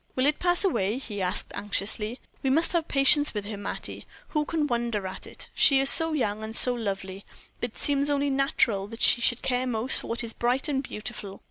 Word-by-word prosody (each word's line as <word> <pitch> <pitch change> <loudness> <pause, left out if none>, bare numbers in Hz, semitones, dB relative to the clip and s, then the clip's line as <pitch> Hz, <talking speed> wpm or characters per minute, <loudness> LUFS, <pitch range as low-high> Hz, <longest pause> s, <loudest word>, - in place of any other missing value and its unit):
"Will 255 - +1
it 295 +1 +1
pass 355 +1 +2
away?" 215 - 0
he 210 -7 -6
asked, 185 +2 +1
anxiously. 210 +3 -2 0.2
"We 270 - 0
must 320 +7 +3
have 335 -2 0
patience 285 0 +4
with 205 -1 -3
her, 210 +1 -5
Mattie. 205 - -7 0.2
Who 300 -1 -1
can 315 -2 -1
wonder 235 -6 -2
at 190 0 -7
it? - - -8
She 275 -2 +5
is 270 0 +7
so 325 -1 +4
young 215 -7 -2
and 220 +1 -5
so 250 - +6
lovely, 195 -4 -5 0.4
it 240 -2 -5
seems 285 0 +1
only 285 0 0
natural 265 -7 +1
that 230 +2 -6
she 240 - +5
should 240 0 +1
care 255 0 0
most 240 +1 0
for - - -9
what 235 +1 -4
is 230 -1 -5
bright 250 +4 0
and 275 -3 -1
beautiful. 210 -5 -8
240 Hz, 215 wpm, -26 LUFS, 210-280 Hz, 0.4 s, is